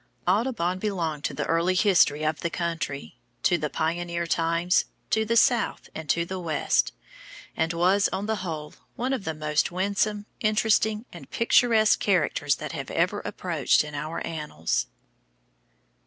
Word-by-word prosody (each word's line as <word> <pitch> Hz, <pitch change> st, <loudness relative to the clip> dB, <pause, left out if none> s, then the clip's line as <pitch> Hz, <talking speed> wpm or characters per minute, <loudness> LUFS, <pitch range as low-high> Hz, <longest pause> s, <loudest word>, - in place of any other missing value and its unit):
Audubon 185 Hz, -3 st, +1 dB
belonged 170 Hz, -8 st, -2 dB
to -, -, -1 dB
the -, -, -2 dB
early 170 Hz, +3 st, +1 dB
history 175 Hz, -6 st, +4 dB
of 155 Hz, 0 st, 0 dB
the 170 Hz, -, -2 dB
country, 165 Hz, -5 st, -4 dB, 0.2 s
to 180 Hz, -, +4 dB
the 155 Hz, -3 st, -2 dB
pioneer 170 Hz, +2 st, -2 dB
times, 170 Hz, +2 st, +1 dB, 0.3 s
to 220 Hz, 0 st, +2 dB
the 230 Hz, +1 st, +1 dB
South 240 Hz, -1 st, +2 dB
and 160 Hz, -2 st, -7 dB
the 170 Hz, +4 st, 0 dB
West, 160 Hz, -4 st, +1 dB, 0.6 s
and 160 Hz, +1 st, 0 dB
was, 185 Hz, +4 st, +3 dB
on 200 Hz, -, -2 dB
the 220 Hz, 0 st, -1 dB
whole, 160 Hz, -5 st, -5 dB, 0.2 s
one 255 Hz, +3 st, -1 dB
of 235 Hz, -7 st, -3 dB
the 160 Hz, -, -2 dB
most 150 Hz, +1 st, 0 dB
winsome, 200 Hz, +3 st, 0 dB
interesting, 215 Hz, 0 st, +2 dB
and -, -, -11 dB
picturesque 230 Hz, -2 st, +4 dB
characters 155 Hz, -6 st, +1 dB
that -, -, -6 dB
have -, -, -5 dB
ever -, -, 0 dB
appeared -, -, +1 dB
in 150 Hz, 0 st, -8 dB
our 155 Hz, +3 st, -4 dB
annals. 150 Hz, -, -2 dB
175 Hz, 150 wpm, -26 LUFS, 160-210 Hz, 0.6 s, history